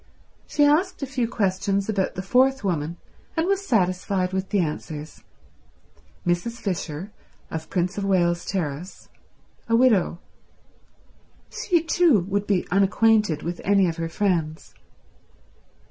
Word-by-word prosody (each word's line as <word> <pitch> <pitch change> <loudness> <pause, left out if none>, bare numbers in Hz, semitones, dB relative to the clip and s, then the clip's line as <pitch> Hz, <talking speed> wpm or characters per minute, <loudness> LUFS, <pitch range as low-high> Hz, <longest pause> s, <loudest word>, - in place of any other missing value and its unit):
She 290 - +3
asked 330 +3 +2
a - - +1
few 260 -3 -1
questions 195 -2 0
about 195 -3 -1
the 185 - -4
fourth 260 +5 +3
woman, 170 -3 -2 0.4
and 325 - +2
was 395 +1 0
satisfied 185 - +1
with 190 0 -2
the 205 - +1
answers. 155 -2 -4 1.0
Mrs. 175 +7 0
Fisher, 190 -5 -4 0.4
of 160 -1 -5
Prince 180 +2 -1
of - - -3
Wales 175 -3 +2
Terrace. 175 -1 -4 0.6
A 230 - +4
widow. 230 -8 +3 1.3
She 345 -4 0
too 330 - +4
would 200 +3 -2
be 195 -3 +1
unacquainted 200 -2 +3
with 170 +1 -4
any 195 -1 +3
of 165 0 -3
her 165 0 -3
friends. 165 -5 -1
195 Hz, 130 wpm, -24 LUFS, 175-230 Hz, 1.3 s, A